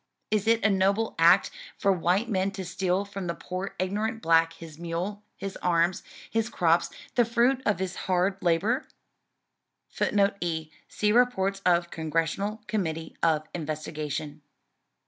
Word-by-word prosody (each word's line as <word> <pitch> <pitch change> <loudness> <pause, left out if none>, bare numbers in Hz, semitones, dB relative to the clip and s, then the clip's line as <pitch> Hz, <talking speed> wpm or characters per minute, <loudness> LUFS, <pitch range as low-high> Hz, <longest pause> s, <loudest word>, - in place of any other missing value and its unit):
Is 215 0 +1
it 225 -2 +3
a - - +6
noble 195 +3 +2
act 170 +4 +6 0.3
for 200 - +3
white 185 +5 +1
men 195 -3 +1
to 190 -1 -5
steal 185 +2 0
from 200 -2 -6
the 170 - -2
poor 185 +2 -5
ignorant 210 +5 -1
black 165 0 +4
his 165 -2 -11
mule, 175 +5 -3 0.2
his 195 0 -5
arms, 175 0 +1 0.3
his 225 0 -1
crops, 170 -5 +2 0.2
the 240 - +4
fruit 240 +3 +2
of 205 - +2
his 190 0 -3 0.2
hard 185 +2 +1
labor?" 190 - +1 1.0
[Footnote 200 0 +1
E: 160 -3 -2 0.2
See 210 0 0
Reports 205 -5 +2
of 170 -1 +3
Congressional 165 +7 -2
Committee 165 -7 -3
of 160 -2 +2
Investigation. 150 -2 -4
185 Hz, 145 wpm, -27 LUFS, 165-205 Hz, 1.0 s, a